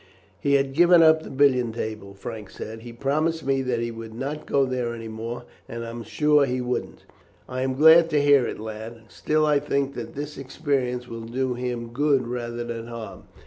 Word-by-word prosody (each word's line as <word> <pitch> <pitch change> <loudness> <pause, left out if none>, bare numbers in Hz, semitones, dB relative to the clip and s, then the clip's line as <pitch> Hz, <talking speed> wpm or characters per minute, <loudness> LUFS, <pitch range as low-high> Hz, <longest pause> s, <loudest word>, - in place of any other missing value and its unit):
"He 140 0 +2
had 135 -1 +1
given 175 +2 +6
up 160 0 +6
the - - -9
billiard 130 -4 +2
table," 110 -4 -5
Frank 105 0 -7
said. 110 +1 -8
"He 120 +1 -10
promised 155 +6 -1
me 135 0 +1
that 125 -2 -1
he 120 0 -2
would 115 -1 -9
not 140 +5 -5
go 140 -1 +3
there 125 -2 -2
any 115 -1 -7
more, 115 +2 -5 0.3
and 115 0 -5
I 115 - -6
am 120 0 -6
sure 150 +5 +3
he 130 0 -1
wouldn't." 125 0 -4 0.4
"I 130 0 -4
am 130 0 -1
glad 160 +3 +7
to 150 -2 +2
hear 145 -3 +5
it, - - -5
lad; 110 +1 -7
still 155 0 +1
I 150 -1 +3
think 140 -1 -1
that 120 -3 -7
this 150 +1 -6
experience 130 -2 -2
will 115 -1 -7
do 130 +2 -1
him 120 -1 -4
good 140 -2 +2
rather 120 -1 -4
than 115 -1 -5
harm. 115 -3 -8
125 Hz, 205 wpm, -25 LUFS, 115-140 Hz, 0.4 s, glad